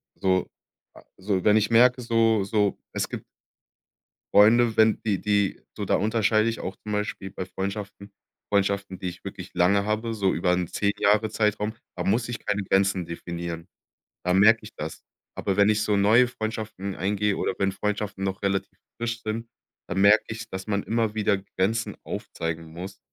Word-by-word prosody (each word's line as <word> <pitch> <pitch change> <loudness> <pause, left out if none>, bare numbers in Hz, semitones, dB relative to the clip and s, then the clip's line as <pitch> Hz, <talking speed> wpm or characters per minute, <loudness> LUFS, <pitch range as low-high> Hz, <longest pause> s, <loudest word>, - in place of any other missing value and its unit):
so 95 -1 +1 0.7
so, 95 -1 -1
wenn 105 +1 +5
ich 105 -1 +1
merke, 125 +2 +5
so 115 -3 +2
so, 105 0 0
es - - -1
gibt - - -6 1.1
Freunde, 115 +2 +6
wenn 110 0 +4
die 105 -3 0
die 100 -2 +1 0.2
so, - - -3
da - - +2
unterscheide 110 +1 +2
ich 115 - -3
auch 95 - -5
zum 105 - -7
Beispiel 105 -2 -3
bei 95 - -5
Freundschaften. 100 +1 -6 0.4
Freundschaften, 100 -1 0
die 90 - -4
ich 90 0 -9
wirklich - - -7
lange 100 +3 +3
habe, 110 +2 -1
so 100 -3 +1
über 90 +2 +1
'n 90 -1 0
10- 100 0 0
Jahre-Zeitraum, 105 0 +1 0.2
da 90 - -3
muss 115 +6 +1
ich 120 - -4
keine 105 0 0
Grenzen 95 -1 +2
definieren. 85 0 -6 0.6
Da 90 - +1
merke 110 +4 +6
ich 110 - -11
das. 80 +1 -6 0.3
Aber 100 -1 -2
wenn 100 +1 +5
ich 105 0 +2
so 105 -1 +1
neue 110 +5 +5
Freundschaften 110 -4 -5
eingehe 100 +1 0
oder - - -1
wenn 100 0 +1
Freundschaften 105 0 -3
noch 95 0 -2
relativ 100 0 -1 0.2
frisch 115 0 -3
sind, 115 +2 -3 0.4
dann 90 - -2
merke 105 +2 +6
ich, 110 0 -6
dass 95 +1 -6
man 100 -2 0
immer 115 -1 0
wieder 105 -2 +2 0.2
Grenzen 110 +5 0
aufzeigen 80 -1 -5
muss, 90 +4 -8
105 Hz, 175 wpm, -25 LUFS, 95-110 Hz, 1.1 s, Freunde